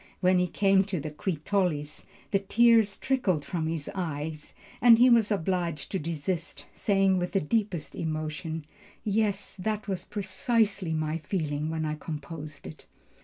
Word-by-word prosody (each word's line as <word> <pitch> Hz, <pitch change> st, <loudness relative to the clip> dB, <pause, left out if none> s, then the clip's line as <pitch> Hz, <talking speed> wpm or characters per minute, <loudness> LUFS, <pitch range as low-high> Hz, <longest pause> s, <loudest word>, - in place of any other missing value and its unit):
When 185 Hz, 0 st, +4 dB
he 180 Hz, -, +2 dB
came 195 Hz, +2 st, +3 dB
to 190 Hz, -4 st, -2 dB
the 150 Hz, +1 st, -5 dB
Qui 160 Hz, +3 st, -2 dB
tollis, 155 Hz, -7 st, -1 dB, 0.3 s
the 195 Hz, -, +3 dB
tears 225 Hz, 0 st, +4 dB
trickled 195 Hz, -, 0 dB
from 165 Hz, -3 st, -2 dB
his 160 Hz, -3 st, -3 dB
eyes 155 Hz, -4 st, -4 dB, 0.3 s
and 230 Hz, 0 st, +8 dB
he 250 Hz, +2 st, +6 dB
was 230 Hz, -3 st, +5 dB
obliged 175 Hz, -5 st, -1 dB
to 190 Hz, -, -1 dB
desist, 165 Hz, +2 st, -3 dB
saying 195 Hz, -2 st, +2 dB
with 180 Hz, 0 st, -3 dB
the 195 Hz, -, +3 dB
deepest 190 Hz, -2 st, -1 dB
emotion, 155 Hz, 0 st, -4 dB, 0.4 s
"Yes, 205 Hz, -1 st, 0 dB
that 215 Hz, +3 st, -2 dB
was 190 Hz, -3 st, -3 dB
precisely 200 Hz, -2 st, 0 dB
my 155 Hz, +1 st, -1 dB
feeling 150 Hz, -2 st, -2 dB
when 160 Hz, -1 st, -2 dB
I 150 Hz, -, -1 dB
composed 155 Hz, -1 st, -7 dB
it." 80 Hz, -, -11 dB
180 Hz, 155 wpm, -28 LUFS, 155-200 Hz, 0.4 s, and